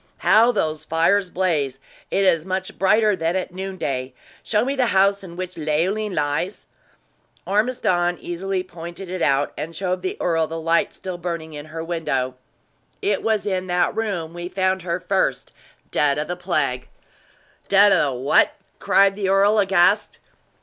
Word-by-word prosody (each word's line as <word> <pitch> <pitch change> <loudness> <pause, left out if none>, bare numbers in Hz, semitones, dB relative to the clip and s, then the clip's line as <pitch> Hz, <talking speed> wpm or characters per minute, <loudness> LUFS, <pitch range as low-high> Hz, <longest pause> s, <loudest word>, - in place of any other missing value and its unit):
"How 230 +3 +6
those 155 -8 -2
fires 180 +5 +2
blaze! 155 -8 -1 0.3
It 195 - +1
is 165 -4 +3
much 185 +1 -4
brighter 210 +2 +4
than 165 0 -1
at 185 -1 -3
noon 190 +1 -5
day. 130 -4 -3 0.3
Show 215 +1 0
me 275 +2 -1
the 255 -3 +2
house 200 +1 +3
in 170 -2 -10
which 185 0 -6
Leoline 180 +7 0
lies?". 150 +6 -2 0.8
Ormiston 195 -5 +1
easily 185 +2 -3
pointed 175 +1 -9
it 185 - -4
out, 140 0 +2
and 165 +2 -6
showed 185 +1 -2
the 185 - -3
earl 165 -2 +1
the 165 +1 -5
light 165 +1 +1
still 185 -2 -6
burning 170 -2 -5
in 145 +1 -8
her 160 +1 -6
window. 155 -7 -2 0.7
"It 200 -1 +1
was 220 -2 0
in 185 -2 -2
that 180 0 +1
room 190 -8 -3
we 175 0 -6
found 190 0 0
her 170 0 -2
first, 185 -8 -1 0.4
dead 145 -1 +2
of 150 +1 -2
the 180 - -3
plague!" 150 -8 -1 0.8
"Dead 200 +1 +6
of 145 -7 +3
the - - -6
what?" 135 - +3 0.3
cried 195 0 +4
the 195 -2 -1
earl, 200 +2 +4
aghast. 195 0 +3
180 Hz, 165 wpm, -22 LUFS, 160-195 Hz, 0.8 s, How